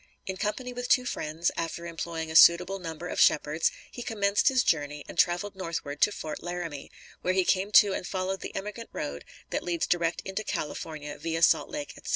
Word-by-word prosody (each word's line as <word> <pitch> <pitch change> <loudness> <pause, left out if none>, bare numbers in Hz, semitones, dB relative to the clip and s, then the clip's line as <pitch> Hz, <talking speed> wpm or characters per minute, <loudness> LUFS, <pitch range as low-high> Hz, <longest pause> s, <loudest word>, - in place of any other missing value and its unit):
In 190 - -3
company 215 +6 -3
with 245 0 -5
two 250 - +4
friends, 160 -6 -1
after 170 +1 -4
employing 165 -1 -4
a - - -6
suitable 180 +4 +7
number 165 -1 -6
of - - -4
shepherds, 155 +2 +3 0.2
he 245 - -7
commenced 205 -3 +1
his 260 -3 +4
journey 145 -2 0
and - - -9
traveled 175 +4 +1
northward 165 -6 -5
to - - +5
Fort 155 -6 -6
Laramie, 175 -5 -5 0.3
where 185 +1 0
he 190 -1 +3
came 195 +3 +1
to 200 -1 +7
and 180 - -4
followed 190 0 -2
the - - -7
emigrant 210 +4 -5
road 70 0 -5 0.3
that - - -1
leads 170 -2 -1
direct 170 -1 0
into 195 +3 -3
California 150 -4 -5
via 165 0 -2
Salt - - +4
Lake, 295 -1 -5
etc. - - -10
175 Hz, 195 wpm, -28 LUFS, 160-200 Hz, 0.3 s, suitable